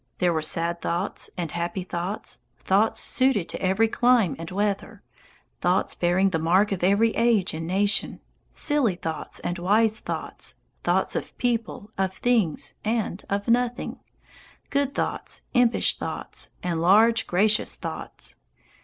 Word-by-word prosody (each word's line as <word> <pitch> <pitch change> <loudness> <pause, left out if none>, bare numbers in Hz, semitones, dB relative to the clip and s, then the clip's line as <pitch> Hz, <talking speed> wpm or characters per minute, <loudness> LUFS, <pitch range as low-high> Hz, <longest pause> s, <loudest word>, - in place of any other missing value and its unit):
There 175 -1 +2
were 160 - 0
sad 170 +2 +1
thoughts 175 +5 -2
and 170 -3 -3
happy 175 +2 -3
thoughts, 180 +3 -4 0.2
thoughts 205 +4 +2
suited 255 -9 +2
to - - -4
every 190 +4 +3
clime 240 - +3
and 165 0 -6
weather, 200 +1 -2 0.6
thoughts 180 +2 +1
bearing 180 +3 +2
the 165 - 0
mark 185 +6 +3
of 185 -3 -2
every 200 +5 +4
age 230 -5 +2
and 165 +1 -4
nation, 200 +3 0 0.3
silly 285 - +1
thoughts 160 -3 -5
and 175 0 -3
wise 215 +4 +3
thoughts, - - -5 0.3
thoughts - - +1
of - - -4
people, 230 -3 -2
of 190 -1 0
things, 225 -11 +1
and 215 -3 -1
of 200 0 -1
nothing, 245 +1 0 0.7
good 280 -1 0
thoughts, - - -3
impish 245 -2 +3
thoughts, - - -4
and 170 -2 -1
large, 220 +6 +5
gracious 210 +4 +2
thoughts. - - -6
200 Hz, 140 wpm, -25 LUFS, 175-225 Hz, 0.7 s, large